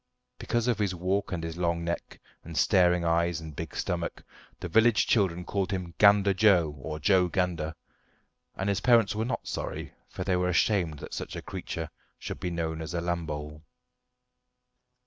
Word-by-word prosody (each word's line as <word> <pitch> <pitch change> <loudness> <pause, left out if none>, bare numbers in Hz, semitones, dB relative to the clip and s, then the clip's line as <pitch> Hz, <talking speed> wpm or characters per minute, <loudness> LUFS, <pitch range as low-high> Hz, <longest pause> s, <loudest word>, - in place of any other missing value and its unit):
Because 120 0 -1
of 120 -3 +1
his 100 -3 0
walk 95 +4 -1
and 85 -3 -3
his 80 0 -5
long 85 -1 0
neck, 85 0 -4 0.2
and 80 -1 -7
staring 90 -3 +4
eyes 85 0 +1
and 80 -2 -9
big - - -6
stomach, 85 -1 -3 0.4
the - - -4
village 110 +4 +4
children 90 -5 +1
called 100 -2 -1
him 90 -3 -4
"Gander 100 -1 +6
Joe" 90 -6 +4
or 75 +2 -5
"Joe 90 +3 +4
Gander"; 85 -3 -1 0.8
and 95 - -3
his 100 0 0
parents 115 -3 +4
were 110 +1 -1
not 125 - -3
sorry, - - -4 0.2
for - - -5
they 95 - +1
were 90 0 +1
ashamed 85 -3 +2
that - - -9
such - - -5
a - - -5
creature - - -5 0.3
should - - -6
be 90 - -2
known 80 -2 -3
as 80 +1 -5
a - - 0
Lambole. 80 -3 -4
90 Hz, 175 wpm, -28 LUFS, 85-100 Hz, 0.8 s, Gander